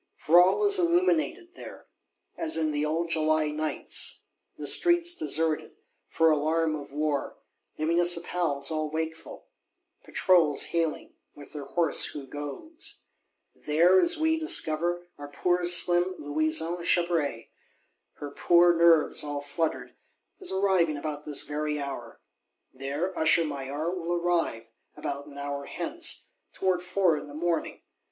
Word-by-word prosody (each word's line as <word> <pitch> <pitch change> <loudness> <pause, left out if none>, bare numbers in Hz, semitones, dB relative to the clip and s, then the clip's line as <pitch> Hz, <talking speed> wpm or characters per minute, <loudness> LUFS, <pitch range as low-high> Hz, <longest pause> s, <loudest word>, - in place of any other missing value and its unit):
For 170 +4 +5
all 185 - +2
is 405 -1 +4
illuminated 350 0 +1
there, - - -11 0.5
as 325 -1 -2
in 155 -1 0
the 145 0 -1
old 165 +2 -2
July 155 -1 +1
Nights; 155 +1 -2 0.3
the - - -6
streets 345 0 +3
deserted, 155 +1 -1 0.3
for 165 0 +3
alarm 155 +1 +1
of 145 -2 -9
war; 150 -1 -2 0.4
the 155 - -2
Municipals 170 -3 +2
all 155 -1 -2
wakeful; 160 +1 -6 0.6
Patrols 170 - +3
hailing, 165 -2 -2 0.2
with 145 - -14
their 145 -2 -7
hoarse 165 +2 +2
Who 145 -2 -7
goes. 145 - -7 0.5
There, 170 +5 +3
as 345 - +3
we 320 0 +1
discover, 175 - 0
our 145 - -7
poor 180 +4 0
slim 175 +1 +3
Louison 155 +3 -2
Chabray, 170 -9 0 0.6
her 145 -1 -8
poor 175 +3 +4
nerves 165 -3 +4
all 145 -1 -4
fluttered, 160 +3 -3 0.5
is 375 - -3
arriving 190 -5 +1
about 150 0 -6
this 145 -2 +2
very 150 0 -3
hour. 135 -5 -7 0.5
There 140 +8 -4
Usher 160 +1 +3
Maillard 145 +4 -4
will 170 0 -3
arrive, 170 -9 -1 0.3
about 140 +1 -5
an 140 -1 -13
hour 140 0 -5
hence, - - -3 0.2
"towards 185 -2 0
four 180 -4 +1
in - - -10
the 145 - -11
morning." 170 +1 -2
160 Hz, 135 wpm, -27 LUFS, 150-175 Hz, 0.6 s, For